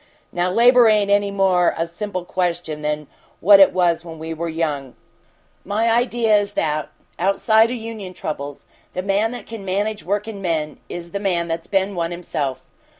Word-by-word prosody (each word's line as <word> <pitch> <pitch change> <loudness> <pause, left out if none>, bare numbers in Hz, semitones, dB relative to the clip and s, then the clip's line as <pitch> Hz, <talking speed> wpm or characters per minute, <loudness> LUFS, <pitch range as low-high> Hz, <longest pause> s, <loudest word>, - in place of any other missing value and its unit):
Now, 175 +1 0
labor 240 +4 +6
ain't 210 -2 +3
any 205 0 +3
more 190 -3 +2
a 165 - 0
simple 185 +1 -5
question 175 -4 -2
than 150 0 -2 0.3
what 200 +2 +7
it 195 - +7
was 175 -2 +1
when 165 -1 -9
we 160 +1 -5
were 165 +1 -4
young. 150 -5 -3 0.7
My 225 +3 +1
idea 235 -2 +2
is 205 0 -2
that, 150 -1 -1 0.3
outside 220 +4 +3
o' 250 - -2
union 220 -5 -7
troubles, 145 -2 -6 0.3
the 185 - -2
man 200 +3 +1
that 245 - -8
can 225 -3 -8
manage 205 +3 -2
workin' 205 +2 -3
men 160 -4 -2
is 170 -1 -7
the 200 - -3
man 175 -4 0
that's 165 0 -4
been 195 0 0
one 170 -2 -2
himself. 150 -6 -4
185 Hz, 175 wpm, -21 LUFS, 165-205 Hz, 0.7 s, what